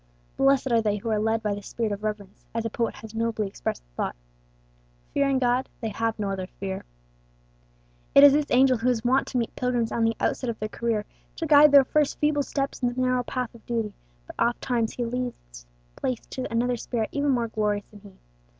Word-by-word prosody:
Blessed 270 -1 +3
are 230 -1 +4
they 210 -1 0
who 220 +3 -4
are 215 - +2
led 225 +1 0
by 210 -1 0
this 200 0 -7
spirit 225 -3 -2
of 205 0 -4
reverence, 210 -2 -5
as 230 0 -1
a 225 - -2
poet 230 +1 -1
has 220 -1 -11
nobly 225 -1 -1
expressed 195 - -4
the - - -36
thought, - - -2 1.0
"Fearing 275 -1 +2
God, 250 0 +1
they 225 - -3
have 225 +1 -2
no 205 -2 -2
other 190 -1 -3
fear." 190 -1 -4 1.3
It 280 - +9
is 285 -1 +10
this 295 0 +1
angel 255 -1 +4
who 245 +3 +1
is 240 -1 0
wont 260 +3 +3
to 255 - -2
meet 230 -2 -2
pilgrims 245 -2 0
on 230 - 0
the 225 0 +1
outset 255 - -1
of 230 - -3
their 215 - -4
career, 225 -2 -1 0.3
to 330 - -3
guide 300 -1 +7
their 280 -1 +8
first 300 +1 +1
feeble 295 -1 +2
steps 275 0 -3
in 245 -1 +1
the 245 - -5
narrow 255 0 +2
path 250 0 -4
of 235 - -16
duty; 225 -3 -2 0.3
but - - -11
oftentimes 235 -1 0
he 245 - -3
yields 230 - -5 0.3
place 255 -3 -3
to 255 - -4
another 240 +2 +1
spirit 230 -1 -2
even 285 0 0
more 240 -4 +1
glorious 210 -2 -1
than 210 - -13
he. 200 -1 -15
230 Hz, 215 wpm, -26 LUFS, 215-255 Hz, 1.3 s, is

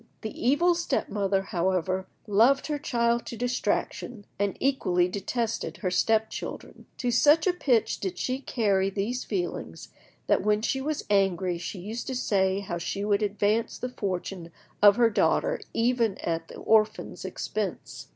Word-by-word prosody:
The 220 - -4
evil 295 +8 +3
step 345 0 -1
mother, 195 -1 0
however, 185 0 -1 0.2
loved 230 +6 +4
her 300 -1 -2
child 235 -5 +1
to 235 - -6
distraction, 245 -2 -2
and 200 -1 0
equally 185 -10 +2
detested 225 +4 -3
her 185 -4 -2
step 220 +4 +2
children. - - -7
To 245 -1 -1
such 295 +6 +5
a 370 - +3
pitch 255 -10 +1
did 185 -2 -4
she 255 +6 -2
carry 200 -7 +1
these 215 +6 -2
feelings 175 - -4 0.4
that - - +2
when 210 +1 +2
she 265 +3 0
was 300 +2 -3
angry 185 -3 +2
she 175 +3 -5
used 215 +6 -6
to 260 - -3
say 195 -5 +1
how 175 -3 -4
she 200 +4 -3
would 205 0 +2
advance 210 +2 0
the 250 - -4
fortune 185 -6 -4 0.3
of 205 -1 +8
her 235 -1 +4
daughter - - +2
even 230 -3 +1
at 165 -1 -2
the - - -11
orphans' 215 0 +1
expense. - - -4
210 Hz, 160 wpm, -27 LUFS, 190-245 Hz, 0.4 s, of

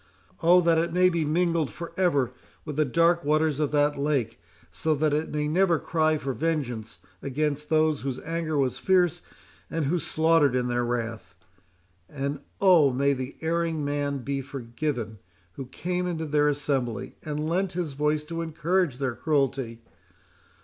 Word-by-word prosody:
—Oh! 175 +2 +6
that 165 -1 +3
it 170 +1 0
may 180 +1 +4
be 170 -2 0
mingled 165 -1 +1
for 170 -1 -8
ever 145 -10 +2 0.3
with 150 -3 -5
the 155 +1 +2
dark 170 +5 +3
waters 155 0 +1
of 150 -2 +1
that 145 -1 +1
lake, 140 -6 -1 0.3
so 160 -1 0
that 150 0 +1
it 155 +2 0
may 150 0 -1
never 175 +2 +3
cry 155 -1 +1
for 135 -2 -3
vengeance 125 -8 -2 0.2
against 150 +1 -2
those 155 -2 +2
whose 130 -1 -3
anger 165 -1 -2
was 130 -3 0
fierce, 180 -3 +2 0.5
and 160 -2 -1
who 170 +6 +1
slaughtered 160 -5 +3
in 125 -1 0
their 120 0 0
wrath!—And, 95 +2 -6 0.2
oh! 175 -8 +6
may 140 +2 +2
the 130 0 -5
erring 165 -2 -1
man 145 -2 -2
be 140 +1 -2
forgiven 120 -3 -4 0.3
who 130 +6 -8
came 180 +7 -3
into 165 -2 -3
their 150 0 +2
assembly, 130 -4 -2
and 150 0 -3
lent 185 +3 0
his 170 -5 -3
voice 150 +2 0
to 165 +2 -5
encourage 165 -2 0
their, 135 -2 -1
cruelty! 135 -5 -1
150 Hz, 160 wpm, -26 LUFS, 135-165 Hz, 0.5 s, Oh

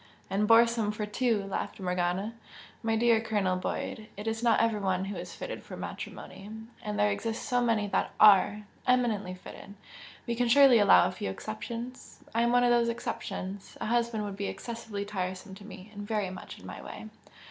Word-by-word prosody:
"And 205 +2 +1
boresome 230 -1 +5
for 210 0 -3
two!" 215 0 0
laughed 195 +1 -4
Morgana 180 +3 -1 0.5
"My 225 0 +1
dear 230 0 +4
Colonel 205 -5 0
Boyd! 215 +3 -4
It 205 - -6
is 225 0 -2
not 235 -2 +4
every 225 -2 +2
one 190 -1 0
who 200 +1 -5
is 175 0 -7
fitted - - -6
for - - -9
matrimony 195 +2 -7 0.3
and 210 -1 -4
there 205 0 +3
exist 225 +3 -3
so 245 0 +1
many 225 -3 +2
that - - +1
ARE, 210 0 +6 0.2
eminently 225 -7 +2
fitted 200 +2 -11 0.5
we 235 - -1
can 245 +1 +1
surely 265 -1 +7
allow 205 -3 +7
a - - -3
few 140 - -4
exceptions! 235 - -7
I 230 - +2
am 235 0 +3
one 245 0 +4
of 245 - +4
those 235 -1 +4
exceptions. 200 -4 -5
A - - -3
husband 235 -1 +1
would 200 -1 -4
be 200 0 -2
excessively 225 -4 -5
tiresome 190 -1 -4
to 195 +2 -11
me, 195 0 -11
and 205 - -7
very 205 -2 -1
much 185 - -9
in - - -14
my - - -8
way!" 220 - -9
210 Hz, 190 wpm, -29 LUFS, 195-235 Hz, 0.5 s, surely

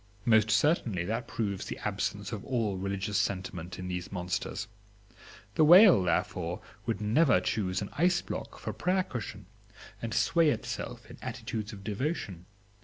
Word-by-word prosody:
Most 110 -2 +5
certainly 115 - +2
that 115 +5 -2
proves 100 -4 -2
the - - -5
absence - - -2
of - - -5
all 115 -6 -1
religious 100 +1 -1
sentiment 90 -4 -3
in 90 - -5
these 90 0 -4
monsters. 100 +3 -3 0.9
The 155 - +4
whale, 180 - +9
therefore, 90 -1 -1 0.3
would 115 -3 0
never 115 - +4
choose 95 0 -1
an 100 - -7
ice 175 +3 +2
block - - -6
for - - -5
prayer 185 +1 +1
cushion, 100 - -6 0.6
and 115 - -3
sway 165 +8 +3
itself - - -4
in - - -12
attitudes 110 0 -4
of 100 -3 -10
devotion. 105 - -3
105 Hz, 150 wpm, -30 LUFS, 95-125 Hz, 0.9 s, whale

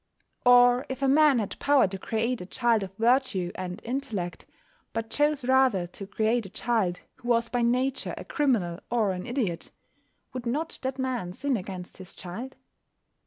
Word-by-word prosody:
Or 245 +1 +7
if 265 +1 -4
a - - +4
man 290 0 +5
had 210 -4 -3
power 280 -6 +4
to 190 +1 -6
create 230 +4 -1
a - - -6
child 235 0 +2
of 190 -2 -5
virtue 230 -6 +2
and 180 +1 -5
intellect, 225 -8 -4 0.5
but 225 0 -3
chose 295 -2 +1
rather 260 -8 +3
to 190 +3 -9
create 220 +1 0
a - - -13
child 205 -4 -1 0.2
who 240 - -11
was 230 -1 +2
by 245 - 0
nature 250 +3 0
a - - -7
criminal 215 - 0
or 225 -4 +2
an 180 +4 -5
idiot, 225 -10 -2 0.6
would 255 -2 -5
not 305 +7 -2
that 260 0 -3
man 250 -9 -2
sin 275 +5 -1
against 185 -3 -6
his 185 -1 -11
child? 225 +9 -7
235 Hz, 170 wpm, -27 LUFS, 190-260 Hz, 0.6 s, Or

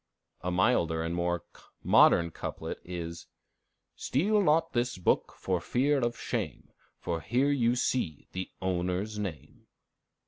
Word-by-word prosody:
A 90 - -2
milder 90 -4 +2
and 85 +1 -2
more 85 0 -1 0.4
modern 85 0 +5
couplet, - - -5
is 85 -1 -6 0.7
"Steal 205 +10 +1
not 165 -1 +2
this 120 -2 0
book 90 - +1
for 90 -2 -1
fear 140 +8 +2
of 120 -2 -1
shame, - - -4 0.3
For 85 -1 -3
here 130 - +1
you 120 -4 +2
see 120 - -1
the 95 0 -4
owner's 95 +3 -1
name." 95 -7 -7
95 Hz, 130 wpm, -29 LUFS, 85-125 Hz, 0.7 s, modern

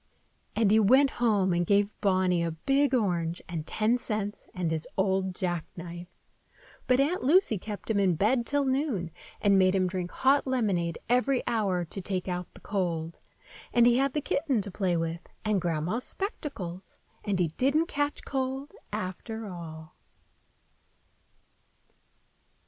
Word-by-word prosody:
And 220 -3 +3
he 220 - +6
went 260 +6 +5
home 205 -6 +3
and 175 0 +2
gave 200 +3 +2
Bonny 185 -3 +2
a 170 - 0
big 270 - +1
orange 175 -7 0
and 165 -2 -5
ten 225 +3 +1
cents 210 -2 -2
and 180 -3 -2
his 160 -1 -2
old 190 -1 +1
jackknife. 175 0 -4 0.8
But 255 0 +4
Aunt 310 +7 +1
Lucy 285 - +4
kept 210 +1 -7
him 220 -3 +1
in 190 -3 +3
bed 235 +8 +2
till 285 -1 +1
noon, 260 - 0 0.3
and 200 -2 +5
made 185 0 +4
him 185 -1 +2
drink 180 -1 -3
hot 275 +1 +3
lemonade 195 -10 0
every 250 +2 +2
hour 195 -6 0
to 195 +4 -6
take 185 0 -3
out 180 -1 -3
the - - -14
cold; 170 -5 -2 0.5
and 240 -1 +5
he 240 0 +5
had 275 -1 +1
the 300 - 0
kitten 280 -3 0
to 200 - -7
play 180 -2 0
with, 165 0 -2 0.2
and 210 -3 +2
Grandma's 175 +7 -1
spectacles, 200 - -5 0.3
and 200 -3 0
he 175 -3 +1
didn't 275 - +2
catch 290 -3 -2
cold, 265 +1 -3 0.2
after 220 +5 -5
all. 160 -4 -9
200 Hz, 150 wpm, -28 LUFS, 175-250 Hz, 0.8 s, he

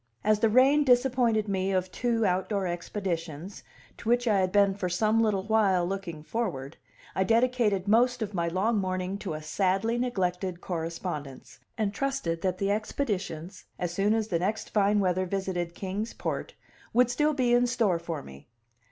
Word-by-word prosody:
As 215 0 +3
the 225 - +3
rain 270 +6 +5
disappointed 245 -4 +3
me 195 -1 0
of 185 -1 0
two 230 0 0
outdoor 190 +1 0
expeditions, 175 -1 -4 0.4
to 225 - -4
which 245 +1 +2
I 205 -3 +4
had 185 -1 +1
been 200 -1 +4
for 190 -2 -3
some 215 +5 +2
little 205 -4 +1
while 200 -4 +2
looking 175 -5 -5
forward, 160 - -3 0.4
I 190 - +1
dedicated 225 -3 +2
most 240 +3 +3
of 210 -1 -5
my 170 -2 0
long 200 +6 +1
morning 185 +1 -2
to 185 -7 -4
a 155 - -7
sadly 195 +8 0
neglected 185 -6 -1
correspondence, 165 -5 -5 0.2
and 210 -3 0
trusted 240 -11 -2
that 185 -1 0
the 195 +1 0
expeditions, 200 - -3
as 175 -1 -3
soon 200 +4 +2
as 220 -1 -1
the 170 - +1
next 205 +5 -2
fine 205 0 +3
weather 185 0 +1
visited 180 -3 -3
Kings 200 +4 -4
Port, - - -4 0.4
would 245 0 +4
still 300 +5 +2
be 250 -3 +2
in 245 0 +4
store 210 -8 +1
for 165 -3 -5
me. 70 +1 -13
195 Hz, 170 wpm, -28 LUFS, 180-225 Hz, 0.4 s, rain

